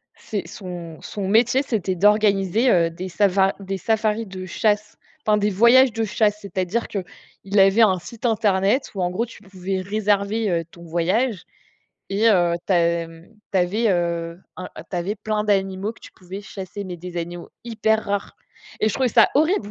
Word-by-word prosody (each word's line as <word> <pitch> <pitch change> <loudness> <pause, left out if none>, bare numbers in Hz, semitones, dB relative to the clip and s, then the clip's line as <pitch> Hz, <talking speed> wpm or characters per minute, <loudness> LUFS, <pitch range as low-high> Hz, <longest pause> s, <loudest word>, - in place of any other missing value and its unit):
c'est 205 -2 -5
son 175 -4 -8
son 200 -2 -5
métier, 235 +6 +3
c'était 195 -7 -1
d'organiser, 205 +3 +3
heu, 170 -2 +3
des 185 +3 -6
savar 195 0 +2
des 195 0 -4
safaris 220 0 0
de 185 -1 -7
chasse, 210 +3 0 0.3
enfin, 210 -1 +4
des 210 0 +1
voyages 235 +5 +6
de 225 +1 -2
chasse. 210 0 +1
C'est-à-dire 195 +3 -2
qu'il 195 +1 -4
avait 195 +4 +5
un 190 -4 +5
site 230 +7 -10
internet 210 +2 +1
où 195 - -3
en 180 - +1
gros, 225 +7 -1
tu 225 - -14
pouvais 190 -1 -4
réserver, 205 +2 0
heu, 170 -1 0
ton 170 0 -14
voyage 180 +6 0 0.7
et 210 +4 +3
heu, 175 -5 +3
tu - - +1
as 170 -1 +2
mmh, 165 +1 -15 0.2
tu 190 - +3
avais, 205 +6 +1
heu, 170 -1 -1 0.2
un 185 - -6 0.2
tu 180 - -3
avais 185 +5 -2
plein 215 0 -2
d'animaux 195 0 0
que - - -21
tu - - -13
pouvais 190 +2 -9
chasser, 200 0 -7
mais 180 -2 -7
des 175 0 -8
animaux 175 +1 -5 0.2
hyper 220 -1 0
rares 200 0 -3 0.4
et 215 - +3
je - - -3
trouvais 260 -2 +1
ça - - +5
horrible! 305 - +2
195 Hz, 185 wpm, -22 LUFS, 180-215 Hz, 0.7 s, voyages